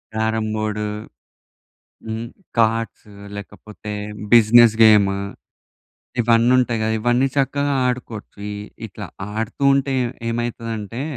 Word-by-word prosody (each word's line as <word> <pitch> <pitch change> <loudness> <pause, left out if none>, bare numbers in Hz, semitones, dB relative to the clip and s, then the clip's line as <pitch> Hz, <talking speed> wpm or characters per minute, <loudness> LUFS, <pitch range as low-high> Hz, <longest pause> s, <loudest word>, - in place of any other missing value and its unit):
Carrom 110 0 0
board 105 0 -2 1.2
హ్మ్, 110 +1 -4 0.3
cards 115 -2 0 0.2
లేకపోతే 105 +1 -9 0.4
business 115 0 +7
game. 105 -3 +6 1.0
ఇవన్నీ 115 +1 +4
ఉంటాయి 120 -2 +1
గదా! 110 0 0
ఇవన్నీ 120 +4 +2
చక్కగా 140 +1 0
ఆడుకోవచ్చు. 120 -5 -5
ఇ - - -5 0.3
ఇట్లా 105 +1 -8 0.3
ఆడుతూ 115 +5 -3
ఉంటే, 135 0 0
ఏ - - 0 0.2
ఏమైతుందంటే 115 -1 -4
115 Hz, 100 wpm, -21 LUFS, 110-120 Hz, 1.2 s, business